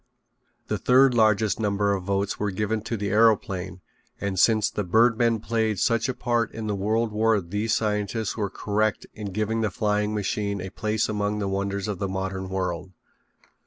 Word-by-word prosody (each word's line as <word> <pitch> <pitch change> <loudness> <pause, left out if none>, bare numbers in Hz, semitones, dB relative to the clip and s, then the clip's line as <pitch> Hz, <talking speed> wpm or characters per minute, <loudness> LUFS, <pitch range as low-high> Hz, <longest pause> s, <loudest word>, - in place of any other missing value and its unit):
The - - -2
third 130 +1 +5
largest 110 -2 +3
number 100 -1 +1
of 95 -2 -3
votes 100 0 -1
were 105 - 0
given 105 +3 -1
to 115 - -2
the 100 0 -2
aeroplane 100 -5 +2 0.4
and 100 -1 -2
since 110 +1 +4
the 105 - -3
birdmen 115 +3 +3
played 110 -1 0
such 115 +5 +1
a 130 - -2
part 120 -2 0
in 110 -1 -4
the 105 - -1
world 110 +3 0
war 110 0 +2
these 105 +5 -1
scientists 105 0 -1
were 105 -3 -2
correct 105 +2 -1
in 105 -2 -6
giving 110 +3 -1
the 110 - +1
flying 105 +2 0
machine 100 0 -2
a 95 +1 -6
place 110 0 -1
among 105 0 -1
the 100 -1 -2
wonders 100 0 -2
of 105 -4 -3
the 100 - -2
modern 95 0 -3
world. 95 -1 -3
105 Hz, 180 wpm, -25 LUFS, 100-110 Hz, 0.4 s, third